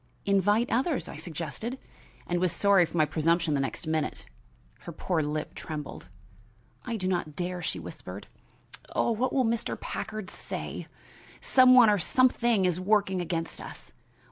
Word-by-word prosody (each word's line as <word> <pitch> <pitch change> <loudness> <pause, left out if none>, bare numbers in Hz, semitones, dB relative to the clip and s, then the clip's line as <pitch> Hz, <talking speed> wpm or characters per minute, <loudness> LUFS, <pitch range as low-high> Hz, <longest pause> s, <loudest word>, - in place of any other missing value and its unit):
"Invite 205 +4 +2
others," 265 +5 0
I - - -8
suggested, 165 - -5 0.5
and 175 0 -1
was 180 -1 +2
sorry 200 -4 +4
for 175 - -6
my 155 - +5
presumption 165 +1 +1
the 140 - +1
next 135 +5 -3
minute. 155 -1 -2 0.5
Her - - -8
poor 170 +1 -1
lip 150 +1 -3
trembled. 150 - -7 0.8
"I 235 -2 -3
do 185 -3 -2
not 175 -5 -1
dare," 180 +1 -3
she - - -2
whispered. - - -8 0.7
"Oh, - - +2
what 245 +3 0
will 260 -2 +2
Mr. 230 0 -1
Packard 215 -3 -5
say! - - -6 0.5
Some 255 -1 +6
one 245 -3 +8
or 205 - +2
something 240 0 +3
is 180 -1 +1
working 190 -1 +2
against 165 -1 -3
us. - - -10
185 Hz, 155 wpm, -28 LUFS, 165-225 Hz, 0.8 s, one